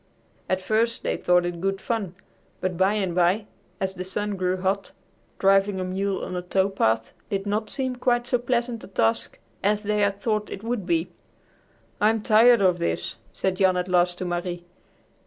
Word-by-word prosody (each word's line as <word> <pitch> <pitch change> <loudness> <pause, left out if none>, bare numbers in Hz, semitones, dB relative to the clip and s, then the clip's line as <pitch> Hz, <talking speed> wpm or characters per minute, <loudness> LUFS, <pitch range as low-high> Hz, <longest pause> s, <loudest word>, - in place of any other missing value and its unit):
At 185 0 +1
first 225 +3 +1
they - - 0
thought 180 0 +3
it 175 -1 -4
good 195 0 0
fun, 200 -3 -3 0.4
but 185 -1 -2
by 190 +3 +3
and 190 -4 -1
by, 180 +4 +2 0.3
as 190 0 -1
the 185 -1 -5
sun 205 +2 -2
grew 185 0 0
hot, 190 +1 -1 0.4
driving 195 0 +3
a - - -1
mule 190 +1 -2
on 180 - -5
a 180 - -2
tow 190 +2 +1
path 115 -11 0 0.2
did 195 0 -2
not 210 +1 -1
seem 260 -2 -1
quite 240 -1 +1
so 245 0 +1
pleasant 240 -1 -1
a - - -9
task 115 -10 0 0.3
as 210 +1 +2
they 210 0 0
had 200 -1 +1
thought 215 -2 -1
it 195 - -7
would 230 -5 -3
be. 170 0 0 0.9
"I'm 215 +1 +3
tired 230 +1 +6
of 185 -2 +3
this," 85 0 -2
said 190 -1 -1
Jan 185 -1 +3
at 180 0 -1
last 175 -1 +2
to 185 - -4
Marie. 175 0 -3
195 Hz, 190 wpm, -25 LUFS, 180-210 Hz, 0.9 s, tired